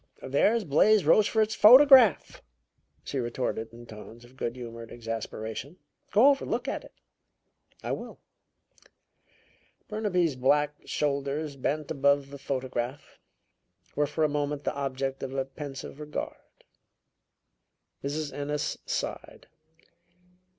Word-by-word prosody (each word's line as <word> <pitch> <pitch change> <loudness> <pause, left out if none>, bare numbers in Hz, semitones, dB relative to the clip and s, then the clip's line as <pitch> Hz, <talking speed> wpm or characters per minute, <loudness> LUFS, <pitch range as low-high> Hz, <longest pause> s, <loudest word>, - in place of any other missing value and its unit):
"There's 205 - +2
Blais 190 +7 +4
Rochefort's 215 +5 +3
photograph," 255 - +7 0.6
she 135 - -4
retorted 120 -2 -3
in 120 +1 -12
tones 115 +2 -12
of 125 +2 -19
good 120 -2 -3
humored 115 -2 -9
exasperation. 115 - -6 0.3
"Go 230 +8 +6
over 275 -1 +1
and - - -6
look - - -2
at - - -3
it." - - -16 0.9
"I - - -3
will." - - -6 1.7
Burnaby's 180 - 0
black 145 +3 +2
shoulders, 140 +1 -2
bent 150 +3 -2
above 140 -1 +2
the 140 - -9
photograph, 130 -1 -4 0.8
were 150 0 +1
for 150 +2 -1
a - - +5
moment 145 0 -2
the - - -1
object 135 -1 -3
of 135 0 -5
a 135 -1 -1
pensive 135 0 -8
regard. 150 0 -5 1.6
Mrs. 145 +1 -3
Ennis 145 +1 -3
sighed. - - -4
140 Hz, 115 wpm, -28 LUFS, 130-155 Hz, 1.7 s, photograph